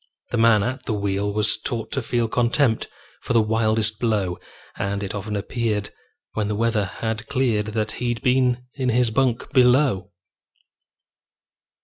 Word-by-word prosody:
The 120 - 0
man 115 -3 +5
at 130 +3 -4
the 110 - 0
wheel 100 0 -1
was 105 +1 +1
taught 115 0 -4
to 135 - -1
feel 120 -1 0
Contempt 120 +1 +1 0.3
for - - -2
the 115 - +5
wildest 110 0 +1
blow, 105 -6 0 0.4
And 100 0 -2
it 100 - -4
often 105 +1 -4
appeared, 105 -1 -2 0.4
when 105 -2 -1
the 105 - -1
weather 110 -1 +1
had 110 +3 -4
cleared, 120 -6 +1
That 110 0 -2
he'd 120 0 -1
been 125 -1 +2
in 130 -2 -1
his 120 -1 +2
bunk 130 +2 0
below. 125 -7 +4
110 Hz, 150 wpm, -23 LUFS, 105-125 Hz, 0.4 s, man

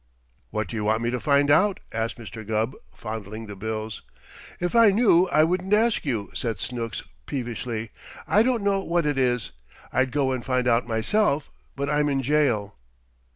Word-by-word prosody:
"What 110 -2 -2
do 115 - -7
you 110 - -2
want 110 +2 +1
me 120 - 0
to 125 - -1
find 145 0 +3
out?" 195 +5 +4
asked 115 0 -2
Mr. 110 -1 -8
Gubb, 110 +4 -1 0.2
fondling 110 0 -6
the 105 -1 -8
bills. 110 +1 -4 0.6
"If 175 +3 -2
I 230 -2 +7
knew, 195 -4 +4
I 155 -2 +4
wouldn't 180 +4 0
ask 225 -2 +2
you," 115 -8 -2
said 115 -6 -3
Snooks 115 -1 -4 0.2
peevishly. 120 -3 -4 0.4
"I 210 - +4
don't 240 -2 +1
know 200 -1 +2
what 170 -3 0
it 145 -2 0
is. 125 - +1 0.4
I'd 130 0 +2
go 140 -2 +1
and 130 -2 -2
find 125 -1 0
out 120 0 +2
myself, 140 - +1 0.2
but 140 +1 -2
I'm 150 0 +2
in 135 -1 0
jail." 120 -8 +1
125 Hz, 180 wpm, -25 LUFS, 110-155 Hz, 0.6 s, I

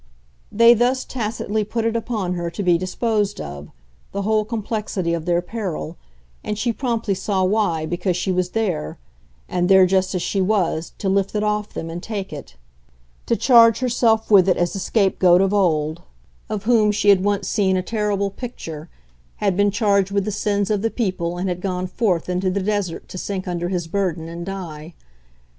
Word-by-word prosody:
They 230 +2 +7
thus 245 +3 +1
tacitly 220 -2 -2
put 225 +2 -3
it 230 0 0
upon 220 -5 -2
her 175 -1 -3
to 170 +4 -5
be 175 -2 +4
disposed 205 +2 -1
of, 70 0 -7 0.4
the 200 - -2
whole 215 +1 +2
complexity 210 -5 -2
of 165 -1 -3
their 175 0 +1
peril, 180 -6 -5 0.5
and 210 - -3
she 235 +2 0
promptly 230 -3 -1
saw 190 0 -1
why 185 -5 +1
because 175 +2 -1
she 185 - -1
was 180 -1 0
there, 180 - -2 0.5
and 180 0 0
there 190 -1 +7
just 190 0 +1
as 180 - -1
she 195 - 0
was, 185 -5 0
to 200 - -3
lift 195 +1 +1
it 210 - 0
off 210 0 -1
them 165 0 -5
and 170 +1 -6
take 200 -4 -5
it; 145 - -9 0.7
to 235 - +2
charge 230 -2 +6
herself 230 -3 +1
with 195 -2 +6
it 185 - +3
as 175 -1 0
the 195 - -4
scapegoat 185 -3 +3
of 195 +1 +2
old, 160 -4 +1 0.5
of 210 -2 -3
whom 220 -2 +4
she 205 0 +1
had 190 -2 +5
once 205 0 0
seen 190 -3 +1
a 185 - -1
terrible 205 -2 -1
picture, 170 -9 -8 0.5
had 200 -3 0
been 205 +1 +3
charged 200 -2 +2
with 200 -1 0
the 215 - -2
sins 205 0 0
of 205 -2 +1
the 225 - +1
people 185 -7 -2
and 185 +2 -2
had 180 -1 -3
gone 185 -1 -2
forth 185 -3 0
into 180 +1 0
the 190 +1 -1
desert 205 -4 -2
to 185 - -7
sink 190 -1 -4
under 175 0 -2
his 180 -3 -2
burden 170 -2 -2
and 170 +1 -7
die. 170 -4 -7
195 Hz, 190 wpm, -21 LUFS, 180-215 Hz, 0.7 s, They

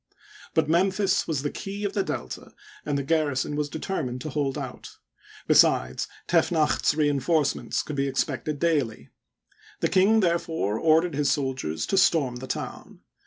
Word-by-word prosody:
But - - +3
Memphis 190 +4 +2
was 150 -4 -1
the 145 - -2
key 200 0 -6
of 200 - -2
the 200 - +1
Delta, 65 - -5 0.3
and 145 -1 0
the 140 - -2
garrison 145 -2 0
was 150 0 -1
determined 145 -6 -3
to 155 - -5
hold 140 -1 -1
out; 130 -4 -8 0.5
besides, 60 +1 +3 0.2
Tefnacht 165 -2 +2
's - - +3
re 150 -1 +2
en 145 -1 +1
forcements 150 0 0
could 150 - -5
be 140 0 +1
expected 145 +2 -2
daily. 140 - -1 0.7
The - - +1
king, 210 +4 +4
therefore, 165 - 0
ordered 160 +2 +3
his 145 0 +1
soldiers 130 - -2
to 195 - +2
storm 145 -10 +2
the 130 +1 -8
town. - - -6
150 Hz, 165 wpm, -26 LUFS, 135-170 Hz, 0.7 s, king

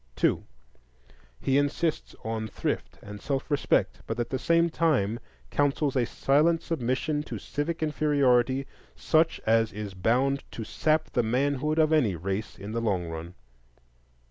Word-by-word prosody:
2. - - +1 1.0
He 135 - +2
insists 150 +3 -1
on 110 0 -3
thrift - - -3
and 105 0 -9
self 140 +2 -3
respect, 145 - +1
but 115 +1 -3
at 120 - -2
the 130 - -1
same 170 +4 +3
time 140 -10 +1 0.3
counsels 145 0 +1
a 125 -3 +2
silent 155 +7 +2
submission 145 +1 -1
to - - -6
civic 160 +3 -3
inferiority 135 -4 +2 0.3
such 160 0 +2
as 115 0 +3
is 105 -1 -6
bound 130 +9 +1
to 115 - -5
sap 155 +7 0
the 125 - +2
manhood 140 +6 0
of 160 0 +4
any 120 - +3
race 95 +5 -4
in 100 +2 -7
the 115 +1 -2
long 95 -7 -1
run. 80 +2 -7
135 Hz, 145 wpm, -27 LUFS, 110-150 Hz, 1.0 s, of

